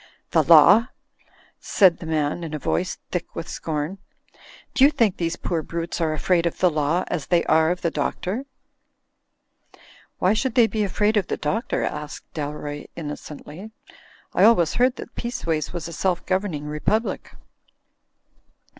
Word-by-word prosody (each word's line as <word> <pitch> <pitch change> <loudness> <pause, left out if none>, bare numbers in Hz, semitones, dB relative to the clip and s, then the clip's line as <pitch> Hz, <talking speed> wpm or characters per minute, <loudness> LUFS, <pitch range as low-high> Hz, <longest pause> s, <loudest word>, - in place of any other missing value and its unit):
"The - - +4
Law!" 230 +2 +7 0.7
said 185 -5 +3
the 165 - -8
man, 155 +1 -1
in 160 -2 -4
a - - -2
voice 175 +4 -1
thick 180 -1 -4
with 165 - -5
scorn. 155 +4 -4 0.7
"Do 265 - +4
you 280 - +8
think 230 -10 +1
these 165 -1 -1
poor 170 -2 -2
brutes 170 +2 -4
are 160 -1 +1
afraid 170 +2 +1
of 170 - -4
the 180 -2 +3
Law 155 +4 +1
as 155 -5 -4
they 175 -2 +3
are 160 0 +3
of 180 +1 -2
the 170 - +1
Doctor?" 185 - -2 1.7
"Why 185 +3 +3
should 235 +2 -1
they 240 - +6
be 220 -1 -1
afraid 210 +2 +1
of 200 - +1
the - - -2
Doctor?" 220 - -1
asked 150 0 -5
Dalroy, 145 -1 -5
innocently. 155 +4 -8 0.6
"I - - +3
always 175 -9 +5
heard 250 +1 +2
that - - -9
Peaceways 165 -10 -3
was 170 -2 -5
a 170 - -8
self 180 +2 -1
governing 185 -6 -1
republic." 150 +10 -2
170 Hz, 155 wpm, -23 LUFS, 155-205 Hz, 1.7 s, you